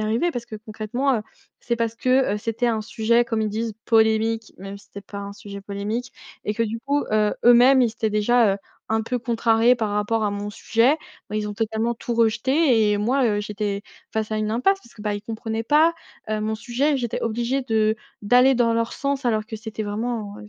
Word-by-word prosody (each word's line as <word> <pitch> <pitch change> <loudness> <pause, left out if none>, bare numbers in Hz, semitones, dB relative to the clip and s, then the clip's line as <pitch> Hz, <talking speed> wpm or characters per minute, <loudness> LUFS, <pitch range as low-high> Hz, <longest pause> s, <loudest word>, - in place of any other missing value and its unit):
arrivé 225 +11 +1
parce 240 -4 -5
que 220 -2 -7
concrètement, 220 +5 -1
heu, - - -2 0.4
c'est 235 - -1
parce 230 -1 -2
que, 255 -2 +2
heu, - - -2
c'était 225 +3 -2
un 225 -2 +1
sujet 235 +2 +1
comme 225 -2 -1
ils 215 - -1
disent 220 0 -3
polémique, 220 0 +2
même 195 +1 -8
si 200 - -21
c'est 200 0 -10
pas 200 +1 -8
un 200 0 -7
sujet 200 -1 -9
polémique. 205 +5 -4 0.3
Et 210 - -1
que 230 - 0
du 225 +1 -2
coup, 285 +2 0
heu, 210 -1 +2
eux-mêmes 245 +2 +7
ils 235 - +2
étaient 220 0 -2
déjà, 215 0 +3
heu, - - -7 0.3
un 220 0 +1
peu 245 +2 -2
contrariés 230 0 +3
par 225 -3 -2
rapport 210 +2 0
à 210 - +1
mon 205 0 -4
sujet. 230 +6 +2 0.3
Bah, - - -6
ils 210 -1 -2
ont 205 - -5
totalement 225 +2 -1
tout 235 +1 -4
rejeté 230 0 +3
et 205 - +1
moi, 255 +5 +1
heu, 205 -2 +1
j'étais 205 -1 -3 0.3
face 220 0 -2
à 215 - -1
une 215 0 -1
impasse 390 - +2
parce 235 - -19
que, 210 - -11
bah, 210 -1 -1
ils 205 - -6
comprenaient 225 0 -4
pas, 310 +6 +4 0.4
heu, 215 - 0
mon 215 +1 -1
sujet. 260 +6 0
J'étais 240 -4 -3
obligée 240 +4 -1
de 220 -2 +1 0.3
d'aller 250 +5 +5
dans 235 -2 +2
leur 230 0 0
sens, 280 -1 -2
alors 220 -3 +1
que 220 0 -7
c'était 220 0 -6
vraiment, 210 0 -3
heu, 210 - -11
225 Hz, 225 wpm, -23 LUFS, 210-240 Hz, 0.4 s, eux-mêmes